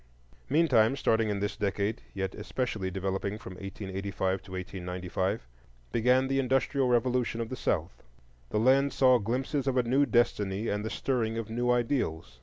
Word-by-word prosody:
Meantime, 135 Hz, -6 st, +4 dB
starting 115 Hz, -5 st, +2 dB
in 100 Hz, -1 st, -1 dB
this 100 Hz, -, -1 dB
decade 100 Hz, +1 st, -1 dB
yet 95 Hz, -1 st, -2 dB
especially 105 Hz, -2 st, -3 dB
developing 95 Hz, +2 st, -2 dB
from 110 Hz, -, -9 dB
1885 95 Hz, 0 st, -3 dB
to 95 Hz, -, -14 dB
1895, 90 Hz, -4 st, -3 dB, 0.4 s
began 125 Hz, +3 st, +3 dB
the 135 Hz, 0 st, +1 dB
industrial 135 Hz, +1 st, +1 dB
revolution 125 Hz, -1 st, +1 dB
of 115 Hz, -1 st, -3 dB
the 130 Hz, -, -4 dB
South. 90 Hz, -6 st, -2 dB, 0.5 s
The -, -, -1 dB
land 135 Hz, +4 st, +4 dB
saw 130 Hz, -2 st, +5 dB
glimpses 130 Hz, +6 st, -1 dB
of 130 Hz, -1 st, +1 dB
a 125 Hz, -, +4 dB
new 135 Hz, +4 st, +2 dB
destiny 105 Hz, -3 st, +1 dB
and 105 Hz, 0 st, -1 dB
the 110 Hz, -, -3 dB
stirring 115 Hz, -4 st, -1 dB
of 115 Hz, -1 st, -4 dB
new 120 Hz, +2 st, 0 dB
ideals. 120 Hz, -, 0 dB
110 Hz, 160 wpm, -29 LUFS, 95-125 Hz, 0.5 s, saw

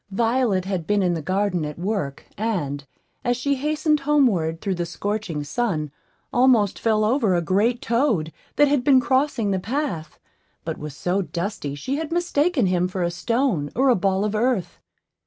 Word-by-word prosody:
Violet 225 Hz, -2 st, +1 dB
had 185 Hz, -4 st, -3 dB
been 205 Hz, -1 st, +2 dB
in 180 Hz, -1 st, +2 dB
the 165 Hz, -, -3 dB
garden 185 Hz, 0 st, 0 dB
at 150 Hz, -1 st, -5 dB
work, 180 Hz, -6 st, -3 dB
and, 150 Hz, -11 st, -2 dB, 0.4 s
as 245 Hz, 0 st, +1 dB
she 280 Hz, +3 st, 0 dB
hastened 300 Hz, +2 st, +1 dB
homeward 240 Hz, -, +2 dB
through 195 Hz, 0 st, -2 dB
the 175 Hz, -1 st, -2 dB
scorching 195 Hz, -4 st, -3 dB
sun, 155 Hz, -, -2 dB, 0.4 s
almost 245 Hz, -6 st, +3 dB
fell 215 Hz, -2 st, +2 dB
over 225 Hz, -5 st, +2 dB
a 175 Hz, -, +2 dB
great 215 Hz, +8 st, +1 dB
toad, 230 Hz, -, +1 dB, 0.2 s
that 290 Hz, -, +5 dB
had 280 Hz, -3 st, +1 dB
been 265 Hz, -1 st, +6 dB
crossing 260 Hz, -5 st, +1 dB
the 190 Hz, -, 0 dB
path, 225 Hz, -, -3 dB, 0.5 s
but -, -, -4 dB
was 150 Hz, -2 st, -7 dB
so 185 Hz, +3 st, 0 dB
dusty 170 Hz, -5 st, -4 dB
she 255 Hz, -, -3 dB
had 320 Hz, 0 st, -4 dB
mistaken 340 Hz, -, +1 dB
him 180 Hz, -1 st, +1 dB
for 185 Hz, -1 st, -3 dB
a 170 Hz, -, 0 dB
stone 225 Hz, -, 0 dB
or 265 Hz, +2 st, +3 dB
a 250 Hz, -, +5 dB
ball 195 Hz, +1 st, +1 dB
of 210 Hz, -, -1 dB
earth. 220 Hz, -4 st, 0 dB
205 Hz, 175 wpm, -23 LUFS, 175-255 Hz, 0.5 s, been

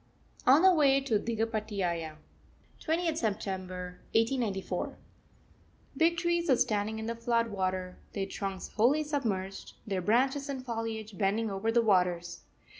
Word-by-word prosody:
ON 280 Hz, +7 st, +7 dB
THE 375 Hz, -1 st, +7 dB
WAY 280 Hz, -4 st, +5 dB
TO 255 Hz, -6 st, +1 dB
DIGHAPATIAYA, 210 Hz, -8 st, -2 dB, 0.7 s
20th 330 Hz, 0 st, 0 dB
September 185 Hz, -, -3 dB, 0.2 s
1894. 225 Hz, -4 st, 0 dB, 1.0 s
Big 335 Hz, +1 st, +3 dB
trees 345 Hz, -1 st, 0 dB
are 260 Hz, -, +6 dB
standing 215 Hz, -1 st, 0 dB
in 220 Hz, -, -4 dB
the 230 Hz, -, -2 dB
flood 230 Hz, 0 st, 0 dB
water, 185 Hz, -2 st, -2 dB
their 195 Hz, -2 st, -1 dB
trunks 195 Hz, -1 st, -5 dB
wholly 260 Hz, +8 st, +3 dB
submerged, 210 Hz, -11 st, -3 dB
their 195 Hz, -3 st, -1 dB
branches 265 Hz, +8 st, +2 dB
and 265 Hz, -2 st, -4 dB
foliage 225 Hz, -3 st, -4 dB
bending 210 Hz, +2 st, +1 dB
over 195 Hz, +4 st, -1 dB
the 235 Hz, 0 st, +3 dB
waters. 180 Hz, -4 st, +1 dB
220 Hz, 130 wpm, -30 LUFS, 195-265 Hz, 1.0 s, ON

